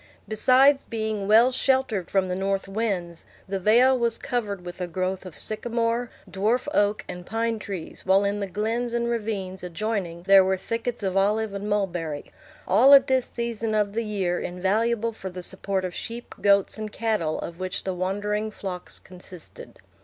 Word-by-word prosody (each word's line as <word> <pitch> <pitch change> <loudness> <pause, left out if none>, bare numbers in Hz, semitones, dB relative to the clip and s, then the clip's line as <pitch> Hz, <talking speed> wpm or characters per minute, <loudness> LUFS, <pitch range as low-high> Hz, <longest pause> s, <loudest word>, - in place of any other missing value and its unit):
Besides 265 +6 +4
being 220 -3 -2
well 230 +4 +6
sheltered 260 -8 +1
from 190 -1 +1
the 180 - -2
north 195 +1 -1
winds, 195 -5 -2 0.2
the 195 0 -2
vale 240 +7 +5
was 235 -2 0
covered 205 -8 -3
with 175 +1 -8
a 180 - -1
growth 185 +2 -3
of 170 - -11
sycamore, 230 +2 -1 0.2
dwarf 215 +7 0
oak, 205 -3 +2
and 180 0 -7
pine 225 +3 -1
trees, 195 -5 -7
while 190 +1 +4
in 200 +1 0
the 200 - -2
glens 225 +5 -2
and 235 0 0
ravines 210 -5 -3
adjoining 180 -2 -3
there 195 0 +7
were 190 0 +1
thickets 230 +3 -4
of 190 -1 -1
olive 210 +2 +1
and 200 +1 -4
mulberry; 175 -7 -2 0.4
all 255 +9 +8
at 270 -1 +6
this 260 -2 +1
season 230 -2 -3
of 205 -1 +1
the 230 +2 -1
year 195 -5 -1
invaluable 220 +6 0
for 190 -3 -7
the 180 0 -7
support 190 +1 -2
of 180 - -4
sheep, 235 +5 -6
goats, 200 +1 +4
and 215 -1 -5
cattle, 210 -10 -1
of 170 +1 -7
which 185 0 -3
the 190 - -2
wandering 205 +4 -2
flocks 190 -4 -6
consisted. 180 -1 -11
205 Hz, 175 wpm, -25 LUFS, 185-230 Hz, 0.4 s, all